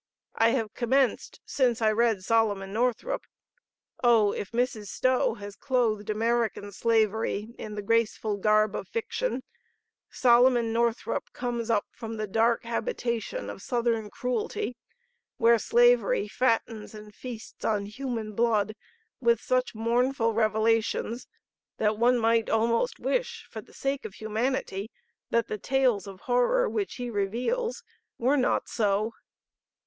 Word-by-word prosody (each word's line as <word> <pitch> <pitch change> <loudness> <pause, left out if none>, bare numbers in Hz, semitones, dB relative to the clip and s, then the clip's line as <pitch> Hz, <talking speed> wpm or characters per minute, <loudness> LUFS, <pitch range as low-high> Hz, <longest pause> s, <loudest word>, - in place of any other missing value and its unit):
I 225 - +4
have 225 -4 -1
commenced 260 +1 0
since 245 -4 +1
I 220 -1 +3
read 220 -3 +1
Solomon 205 -3 +1
Northrup. 250 - 0 0.8
Oh, 225 -4 +5
if 200 - -5
Mrs. 235 -3 -1
Stowe 255 +1 +1
has 205 -2 -9
clothed 230 -6 0
American 225 -1 0
slavery 220 0 0
in 210 -1 -6
the 205 - -4
graceful 220 -1 +1
garb 215 +1 +3
of - - -5
fiction, 460 - -2 0.7
Solomon 240 -2 +4
Northrup 235 0 -1
comes 240 -2 -3
up 215 -3 +2
from 225 -1 -7
the 215 - -2
dark 225 +3 +2
habitation 235 - -3
of - - -7
Southern 235 -3 -1
cruelty 245 -1 -3 0.6
where 230 0 +5
slavery 240 -3 +3
fattens 225 -2 -1
and 210 0 -11
feasts 230 0 -9
on 210 -2 0
human 225 -1 -4
blood 215 -2 +1 0.5
with 235 -3 +3
such 255 -1 0
mournful 230 +1 +1
revelations 225 +2 +1 0.5
that 215 0 +1
one 245 +1 +4
might 230 -1 +2
almost 230 - +1
wish - - -2
for - - -6
the - - -20
sake 275 0 -2
of 205 - -7
humanity 220 -2 -2 0.4
that 230 -1 +1
the 215 - -4
tales 250 -5 +1
of 195 -1 -10
horror 250 - +2
which 405 -2 -2
he 245 -1 -5
reveals 250 - -1 0.3
were 255 +5 +2
not 260 -3 +1
so. 215 0 0
230 Hz, 135 wpm, -27 LUFS, 215-245 Hz, 0.8 s, Oh